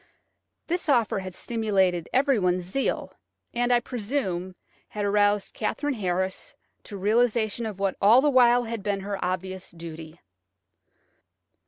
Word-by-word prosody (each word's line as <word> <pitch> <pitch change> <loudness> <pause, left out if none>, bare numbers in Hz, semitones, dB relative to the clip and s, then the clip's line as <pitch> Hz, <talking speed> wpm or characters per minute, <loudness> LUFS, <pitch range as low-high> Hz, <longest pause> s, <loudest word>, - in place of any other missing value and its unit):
This 350 -1 -2
offer 235 -7 +2
had 185 -1 -7
stimulated 195 -7 0
everyone's 210 -10 +2
zeal, 195 +10 -2 0.4
and, 245 +1 +1
I 245 - +5
presume, 205 -7 -3 0.3
had 210 -1 -4
aroused 205 0 +2
Katherine 290 -1 -2
Harris 190 - -2 0.3
to 205 - -8
a - - -5
realisation 225 +2 +1
of 210 -3 -6
what 195 -1 0
had 200 - +3
all 230 +4 +8
the 290 +2 +3
while 245 -2 +5
been 200 -1 -2
her 200 0 -4
obvious 185 +1 -3
duty. 165 -1 -10
205 Hz, 135 wpm, -26 LUFS, 185-240 Hz, 0.4 s, all